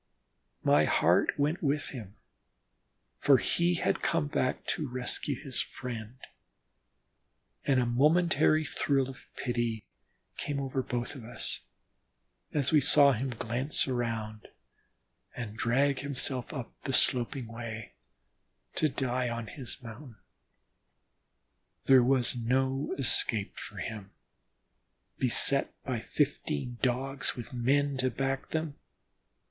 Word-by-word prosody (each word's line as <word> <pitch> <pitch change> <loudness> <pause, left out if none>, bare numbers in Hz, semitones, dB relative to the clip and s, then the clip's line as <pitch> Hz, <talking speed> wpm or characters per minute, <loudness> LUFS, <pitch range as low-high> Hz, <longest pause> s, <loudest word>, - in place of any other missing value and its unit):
My - - +5
heart - - +3
went 150 +5 0
with 145 -1 0
him, 110 -7 -9 1.0
for 140 -2 +6
he 175 +6 +1
had - - 0
come 165 -3 +1
back 130 -3 -1
to 150 - -1
rescue 125 +2 -2
his 135 -4 -2
friend, 115 -2 -7 1.5
and 135 -2 +3
a 125 - +2
momentary 155 +4 +3
thrill 135 -2 0
of 135 -1 -11
pity 120 -3 -2 0.5
came 145 -1 -3
over 135 -1 -2
us 120 0 -2
both, 120 -4 -5 0.9
as 140 -3 0
we 155 -2 +5
saw 140 +1 +7
him 130 +2 -2
glance 120 +5 -1
around 115 -4 -3 0.9
and 115 -4 -6
drag 135 +4 +1
himself 135 -2 -2
up 135 -6 -6
the 135 - -3
sloping 125 +1 +3
way, 115 -1 -7 0.8
to 155 - +3
die 130 -2 -1
on 115 -1 -4
his 125 +2 -9
mountain. 120 +2 -10 1.7
There 130 -1 +7
was 130 -1 +2
no 130 +3 0
escape 115 -5 +1
for - - -8
him, 105 -3 -6 1.1
beset - - +5
by - - -2
fifteen 120 - -2
Dogs 130 +1 0
with 120 +1 -8
men 140 +3 +1
to 130 0 +1
back 135 +2 -2
them. 155 -2 -3
130 Hz, 115 wpm, -30 LUFS, 120-140 Hz, 1.7 s, saw